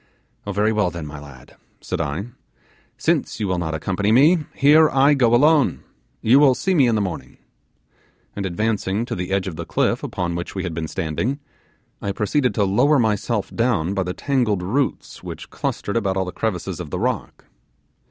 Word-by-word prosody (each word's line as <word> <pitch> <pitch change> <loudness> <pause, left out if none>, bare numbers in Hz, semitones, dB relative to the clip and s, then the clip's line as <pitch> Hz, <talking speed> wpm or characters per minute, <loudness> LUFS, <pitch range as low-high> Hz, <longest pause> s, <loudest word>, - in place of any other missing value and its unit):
'Oh, - - -1
very 105 +3 +1
well 105 -4 +1
then, 85 -2 -7
my 75 0 -8
lad,' 70 -3 -14 0.2
said - - -3
I, 80 +5 -3 0.7
'since - - 0
you 105 - -1
will 90 -1 -1
not 80 -2 -2
accompany 100 +6 -1
me, 150 +7 +5
here 150 +3 +6
I 135 +2 +4
go 120 -4 +3
alone. 150 +2 +3 0.4
You 125 +5 +6
will 140 -3 +5
see 190 - 0
me 140 -8 +4
in 115 - +2
the 105 - +1
morning;' 95 -3 -5 1.0
and 100 - -3
advancing 105 +2 -1
to - - -5
the 90 +1 -4
edge 95 0 0
of 85 -4 -6
the 85 - -4
cliff - - 0
upon 85 -1 -3
which 85 +3 -5
we 95 - -2
had 85 -3 -4
been 80 -1 -3
standing, 95 - -2 0.6
I 100 - -2
proceeded 115 +3 0
to 105 - +2
lower 120 +10 +3
myself 110 -2 0
down 110 -7 +1
by 100 - 0
the 90 0 -3
tangled 120 -9 0
roots 130 +9 -2
which - - -9
clustered 100 - -3
about 95 -4 0
all 95 - 0
the 90 - -5
crevices 100 -5 -3
of - - -6
the - - -3
rock. - - -3
100 Hz, 190 wpm, -21 LUFS, 90-125 Hz, 1.0 s, here